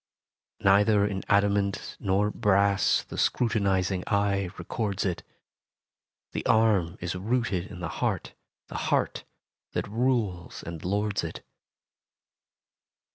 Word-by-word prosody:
Neither 100 +1 +5
in 100 -2 -2
adamant 100 -1 +1
nor 100 +1 +1
brass 100 -1 +3
The - - -7
scrutinizing 95 -5 +1
eye 100 -2 +1
records 100 +2 -2
it: 90 -3 -1 1.1
The - - -3
arm 100 -6 +3
is 85 0 -3
rooted 100 -2 -1
in 90 - -9
the 90 - -2
heart, - - -1 0.3
The - - -7
heart - - 0 0.5
that - - -2
rules 110 -6 -1
and 85 -2 -7
lords 100 +1 0
it. 80 - -6
100 Hz, 110 wpm, -27 LUFS, 95-105 Hz, 1.1 s, Neither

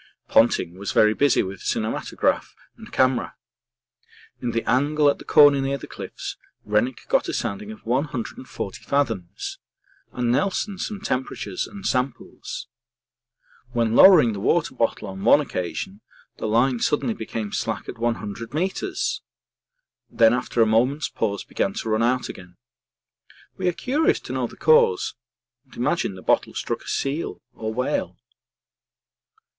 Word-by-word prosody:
Ponting 90 +3 +3
was 100 - -3
very 105 0 +5
busy 140 +3 +3
with 95 -1 -7
cinematograph 110 0 -1 0.2
and - - -13
camera. 130 -1 +1 1.1
In 125 - -1
the 115 0 -2
angle 145 +3 +3
at 140 - 0
the - - -9
corner 145 -2 +6
near 135 +1 -1
the - - -9
cliffs - - -7 0.3
Rennick 105 +5 0
got - - +2
a - - -3
sounding 100 +1 -3
of 110 - -12
140 125 -5 -3
fathoms 115 -10 -2 0.5
and 120 -1 0
Nelson 195 - 0
some 205 -1 -4
temperatures 125 - -3
and 200 -2 -10
samples. 130 -1 -3 1.1
When 115 -2 +1
lowering 155 - +8
the 100 - -5
water 155 - +1
bottle 115 -4 -1
on 95 0 -7
one - - +7
occasion 95 - -4 0.4
the - - -3
line 120 +3 +2
suddenly 185 - +1
became 110 - -5
slack - - -3
at - - -7
100 115 +1 -3
metres, 380 - -1 0.9
then 115 -1 +5
after 120 -1 +1
a - - +3
moment's 125 +7 +2
pause 100 -2 -2
began 95 - -2
to 110 - -4
run 110 +1 +2
out 125 +2 +1
again. 90 -1 -11 1.0
We 185 - -2
are - - +4
curious 275 - +1
to - - -7
know - - -1
the - - -14
cause, 465 -3 +4 0.5
and 130 - -17
imagine 125 - 0
the 95 - -11
bottle - - +1
struck - - -3
a - - -15
seal 145 +5 -2
or 110 0 -4
whale. 125 +3 -2
125 Hz, 145 wpm, -24 LUFS, 110-145 Hz, 1.1 s, lowering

